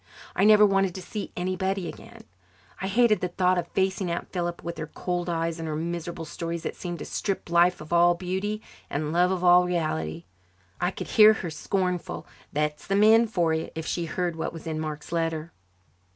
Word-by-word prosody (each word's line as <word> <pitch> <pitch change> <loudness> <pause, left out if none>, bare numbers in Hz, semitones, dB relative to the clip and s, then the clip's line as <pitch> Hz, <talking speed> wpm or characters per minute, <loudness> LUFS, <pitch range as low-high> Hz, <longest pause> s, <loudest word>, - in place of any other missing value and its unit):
I 195 - +3
never 210 0 +8
wanted 195 -2 +2
to 190 - -5
see 205 +3 -5
anybody 185 +1 -1
again. - - -11 0.6
I 190 - -1
hated 220 +2 +3
the 180 - 0
thought 180 0 +2
of 170 - -4
facing 190 0 0
Aunt 170 +1 -4
Philippa 175 -2 -3
with 170 -1 -5
her 155 - -4
cold 175 +2 -3
eyes 165 0 -1
and 165 - -4
her 155 - -2
miserable 170 +1 -4
stories 170 +1 -5
that - - -4
seemed 175 -1 -5
to - - -7
strip 195 -4 -3
life 175 +1 +4
of 155 +2 -6
all 175 0 +5
beauty 190 +4 -3 0.3
and 150 +2 -2
love 180 +1 +4
of 185 -1 -1
all 180 0 +6
reality. 85 - -2 0.6
I 180 - +2
could - - -7
hear 215 -1 +8
her 180 -6 -5
scornful, 180 +2 -2 0.3
"That's 150 0 -2
the 195 - +1
men 220 +3 +6
for 175 -7 +1
you," 160 0 -2
if 160 0 -4
she 170 0 -2
heard 175 +1 -2
what 160 - -3
was 165 - -9
in 160 -1 -3
Mark's 155 -1 -5
letter. 165 -1 -1
175 Hz, 200 wpm, -26 LUFS, 165-190 Hz, 0.6 s, never